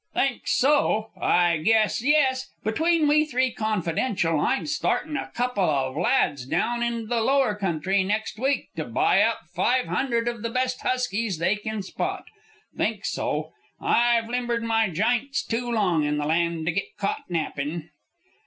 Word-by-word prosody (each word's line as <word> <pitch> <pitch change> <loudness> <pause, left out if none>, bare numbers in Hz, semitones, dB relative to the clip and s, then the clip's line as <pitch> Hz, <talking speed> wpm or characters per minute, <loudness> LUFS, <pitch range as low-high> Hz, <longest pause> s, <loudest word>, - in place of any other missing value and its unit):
"Think 270 -2 0
so! 250 -6 +2
I 175 -2 +2
guess 220 +7 +2
yes. 265 -2 +2
Between 320 +7 +2
we 300 +1 +4
three, 260 -4 0
confidential, 185 -5 0
I'm 265 - 0
startin' 300 0 -1
a - - -3
couple 245 -5 0
of 135 -3 0
lads 150 - +1
down 235 - 0
into 235 -1 -1
the 230 +1 0
Lower 265 -2 +2
Country 190 -1 0
next 215 +2 -2
week 270 +3 0
to - - -2
buy - - +2
up - - +1
five 250 +1 +1
hundred 235 -3 -1
of 235 -2 -3
the 230 - -2
best 255 +1 -1
huskies 230 -6 -1
they 170 +6 +1
kin 215 -1 -4
spot. - - -4 0.5
Think - - -1
so! - - -2 0.3
I've 235 -1 +2
limbered 240 -1 -1
my 225 -2 +2
jints 240 - 0
too 240 +1 -2
long 185 -9 +2
in 150 0 0
the 145 - -1
land 165 +1 0
to 175 - +1
git 195 +4 -4
caught 200 -2 -3
nappin'." 160 -1 -3
225 Hz, 160 wpm, -25 LUFS, 175-250 Hz, 0.5 s, we